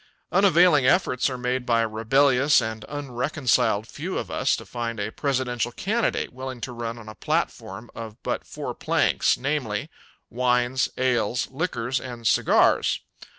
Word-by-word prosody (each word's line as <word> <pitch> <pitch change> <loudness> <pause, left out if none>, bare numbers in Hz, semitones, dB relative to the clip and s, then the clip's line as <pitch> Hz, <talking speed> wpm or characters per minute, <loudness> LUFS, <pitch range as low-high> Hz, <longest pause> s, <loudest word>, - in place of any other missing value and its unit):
Unavailing 175 -6 +5
efforts 135 -3 +2
are 130 - -4
made 125 +1 -1
by 115 -1 +2
a 115 - +1
rebellious 135 +6 +3
and 110 -1 -4
unreconciled 130 -5 0
few - - -5
of - - -4
us - - +1
to - - -9
find 115 -2 -4
a 105 +1 -2
presidential 125 -4 -1
candidate 220 - -1
willing 130 -1 -6
to 120 +2 -5
run 115 0 -5
on 115 -2 -11
a 110 - -8
platform 100 +1 -3
of 110 -2 -8
but - - -2
four - - -6
planks, - - +1
namely: 130 -7 -2 0.4
Wines, 125 +1 +1
ales, 125 -2 0
liquors 130 -5 -2
and 120 -2 -8
cigars. - - +3
125 Hz, 150 wpm, -24 LUFS, 115-135 Hz, 0.4 s, Unavailing